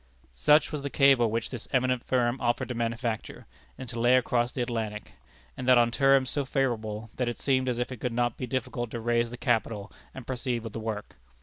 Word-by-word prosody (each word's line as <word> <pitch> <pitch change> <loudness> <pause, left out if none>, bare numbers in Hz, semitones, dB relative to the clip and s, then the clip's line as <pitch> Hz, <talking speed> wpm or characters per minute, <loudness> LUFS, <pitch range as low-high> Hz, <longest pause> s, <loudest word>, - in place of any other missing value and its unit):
Such 150 - +4
was 150 -2 -3
the 140 - -3
cable 135 -5 +4
which 115 +1 -2
this 125 -4 -6
eminent 130 -1 +1
firm 125 0 0
offered 120 0 0
to - - -2
manufacture, 115 -1 -3 0.3
and 130 - -7
to 120 0 -6
lay 120 +2 +5
across 120 -1 +1
the 125 - -2
Atlantic, 110 -3 -4 0.4
and 130 - -6
that 130 -1 +7
on 120 0 +4
terms 135 0 +3
so 145 - -1
favorable, 115 -6 -2
that 125 -2 0
it 120 - -5
seemed 130 -2 +1
as 120 - -1
if 120 +1 -2
it 125 - -5
could 125 - -1
not 120 0 0
be 125 - -5
difficult 120 -2 -3
to 115 - -5
raise 120 0 +1
the 120 - -8
capital 110 -3 -1 0.2
and 130 - -8
proceed 125 -2 -2
with 115 -2 -7
the - - -4
work. 110 -2 -5
120 Hz, 220 wpm, -28 LUFS, 115-130 Hz, 0.4 s, that